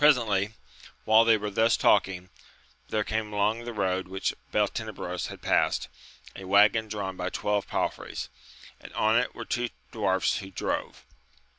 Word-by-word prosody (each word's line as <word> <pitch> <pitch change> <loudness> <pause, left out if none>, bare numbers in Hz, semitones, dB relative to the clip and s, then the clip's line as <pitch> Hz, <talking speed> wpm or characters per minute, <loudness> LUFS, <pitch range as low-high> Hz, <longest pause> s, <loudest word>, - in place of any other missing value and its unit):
Presently, 110 -8 +4 0.5
while 110 +1 +6
they 115 -1 +5
were 105 0 -4
thus 110 +3 +3
talking, 95 -3 +2 0.6
there 105 -1 0
came 110 0 -2
along 105 +3 0
the 120 - -4
road 95 -4 -1
which 95 +1 -2 0.2
Beltenebros - - -2
had - - -10
passed, - - +1 0.5
a 95 - -8
waggon 105 +3 +4
drawn 100 -3 -4
by 90 0 -3
twelve 105 -1 -1
palfreys, - - -3 0.5
and - - -12
on 110 +1 +2
it 125 - -2
were 115 - -6
two 120 +1 -1 0.2
dwarfs 95 -4 +1
who 95 -2 -8
drove. 95 - -4
105 Hz, 150 wpm, -27 LUFS, 95-110 Hz, 0.6 s, while